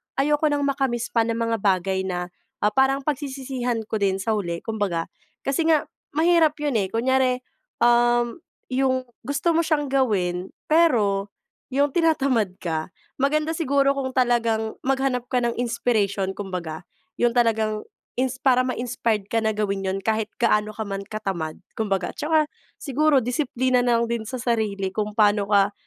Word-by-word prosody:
ayoko 295 +2 +2
nang 290 -1 0
maka-miss 270 -4 -1
pa 230 -1 +2
ng 230 - 0
mga 230 0 0
bagay 190 -1 +1
na, 180 -1 -3 0.3
ah, 210 - +4
parang 270 +3 +2
pagsisisihan 265 -4 -2
ko 220 0 -3
din 195 -2 +2
sa 225 - 0
huli, 175 -6 -2
kumbaga. 205 -7 -2 0.3
Kasi 280 +4 0
nga, 315 -3 +4 0.3
mahirap 325 -1 +4
'yon, 280 -7 +1
eh, 195 - 0
kunyari, 255 +3 +1 0.4
um, 240 +2 +3 0.3
yung 260 0 +1 0.2
gusto 285 +5 0
mo 335 0 +2
siyang 295 -3 0
gawin, 190 -9 0 0.2
pero 215 -12 +3 0.4
yung 285 +2 +3
tinatamad 275 - +2
ka. 160 0 -3 0.2
Maganda 300 +3 +1
siguro 275 -3 +2
kung 260 -1 -2
talagang 230 -3 +1
maghanap 265 -2 0
ka 250 0 0
ng 235 -1 -1
inspiration 215 -5 0
kumbaga, 180 -4 -5 0.3
yung 240 -1 +2
talagang 220 -3 +1 0.4
ins 260 0 0
para 255 -1 +3
ma-inspired 240 -4 -1
ka 225 - +2
na 220 -1 0
gawin 200 -2 -1
'yon 190 - -1
kahit 220 -1 0
gaano 215 -3 +2
ka 220 - -4
man 195 -1 -4
katamad, 190 -7 -4 0.2
kumbaga. 195 -4 -1
At - - -31
tsaka, 315 +1 +3 0.4
siguro 290 0 +2
disiplina 250 -1 +1
na 240 -1 +3
lang - - +1
din 235 -1 -1
sa 255 - -4
sarili, 215 -6 -1
kung 210 0 -3
paano 205 -1 +3
ka, 200 -1 +4
235 Hz, 160 wpm, -24 LUFS, 205-270 Hz, 0.4 s, ah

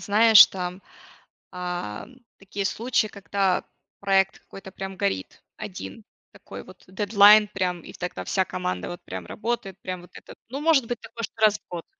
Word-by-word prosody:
знаешь, 220 +1 +8
там, 180 0 -6 0.7
а, 180 - -5 0.3
такие 195 0 -5
случаи, 225 +1 0
когда 200 -2 -1 0.4
проект 195 -1 +2
какой-то 195 0 -12
прям 190 0 -7
горит 95 - -3
один, 210 +1 -8 0.3
такой - - -10
вот - - -16
дедлайн 205 +2 +6
прям, 185 -3 -2
и - - -12
тогда 180 0 -6
вся 190 - +1
команда 90 - -4
вот 175 - -8
прям 90 -2 -7
работает, 215 -4 -4
прям 185 -1 -6
вот 180 - -16
этот, - - -12
ну, 275 +4 -5
может 300 -6 +3
быть 240 0 -4
такое 230 0 -8
раз 215 -1 +3
в - - -46
год, 175 -2 -6
195 Hz, 160 wpm, -25 LUFS, 180-215 Hz, 0.7 s, знаешь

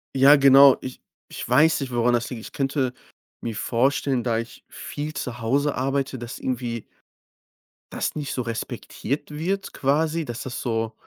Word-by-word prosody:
Ja, 140 +2 +8
genau. 140 -1 +7
Ich 130 - -8 0.3
ich - - -7
weiß 155 +6 +4
nicht, 130 -3 -5
woran 120 +1 +2
das 120 0 0
liegt. 120 -4 -6
Ich - - -10
könnte 135 -2 -1 0.5
mir 115 -2 -5
vorstellen, 130 +3 +1
da 115 -2 0
ich 115 - -9
viel 150 +1 -6
zu 120 -1 -5
Hause 140 +6 +1
arbeite, 135 0 -1
dass 120 +1 -7
irgendwie 120 -3 -3 1.1
das - - -2
nicht 145 -2 -4
so 125 - -2
respektiert 115 +4 -4
wird 185 +6 -3
quasi, 155 +4 +1
dass 120 -4 -6
das 125 -1 -5
so: 115 -2 -2
130 Hz, 165 wpm, -24 LUFS, 120-140 Hz, 1.1 s, Ja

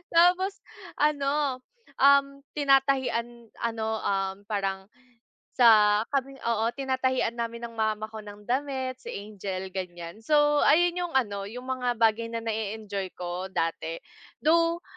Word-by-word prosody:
tapos 365 +3 +4 0.4
ano, 285 -3 +1 0.3
um, 275 0 +4
tinatahian 265 -4 +1 0.2
ano, 220 -1 -2
um, 195 0 -1
parang 195 -1 -2 0.6
sa 215 -3 +6
kaming 275 -1 -1
oo, 230 -1 +1
tinatahian 260 -3 0
namin 235 0 -4
ng 230 -1 -7
mama 215 0 -1
ko 220 - -7
ng 205 0 -11
damit 260 +1 -2
si - - -14 0.2
Angel 190 -2 -6
ganyan. 175 0 -6
So, 300 +7 +1 0.2
ayun, 350 +2 +4
yung 350 -3 -3
ano, 200 -6 0
yung 245 +4 -8
mga 250 -2 -1
bagay 225 0 +2
na, 230 0 -5
na 225 - -1
e-enjoy 210 -2 -4
ko 180 +1 -4
dati 165 -3 -2 0.5
though 335 +2 +3
230 Hz, 130 wpm, -27 LUFS, 205-275 Hz, 0.6 s, sa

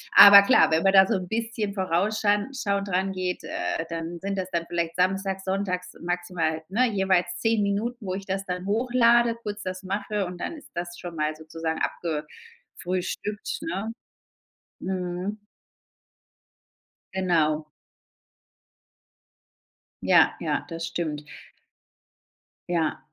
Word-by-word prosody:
Aber 200 0 +11
klar, 200 -6 +5
wenn 160 +1 +3
man 195 0 +4
da 190 -1 +8
so 225 - +1
'n 185 -2 -3
bisschen 225 -1 -2
vorausschan 205 +4 +1
schauend 200 -5 -1
rangeht, 185 -1 -1
äh, 165 - -2
dann 165 +1 -4
sind 195 0 -3
das 185 -1 -3
dann 170 -2 -1
vielleicht 170 -1 -2
samstags, 190 +1 0
sonntags 190 -1 -2
maximal, 175 -2 -2
ne, 245 +6 +3
jeweils 190 -3 +2
10 225 -1 +2
Minuten, 200 0 +1 0.2
wo 190 -3 -3
ich 195 +1 -6
das 195 0 -2
dann 180 +1 -4
hochlade, 235 +1 +3
kurz 210 -1 -5
das 185 0 -4
mache 200 +1 -2
und 180 0 -8
dann - - -3
ist 305 - -12
das 175 0 -5
schon 175 -1 -7
mal 155 0 -1
sozusagen 160 +1 -4
abgefrühstückt, 185 - -4
ne? 225 -10 -3 0.9
Mhm. 185 +2 -3 1.7
Genau. 160 -5 +1 2.4
Ja, - - +5
ja. - - -1
Das 165 0 -4
stimmt. 160 -3 -3 1.5
Ja. 165 -3 0
190 Hz, 125 wpm, -26 LUFS, 175-205 Hz, 2.4 s, Aber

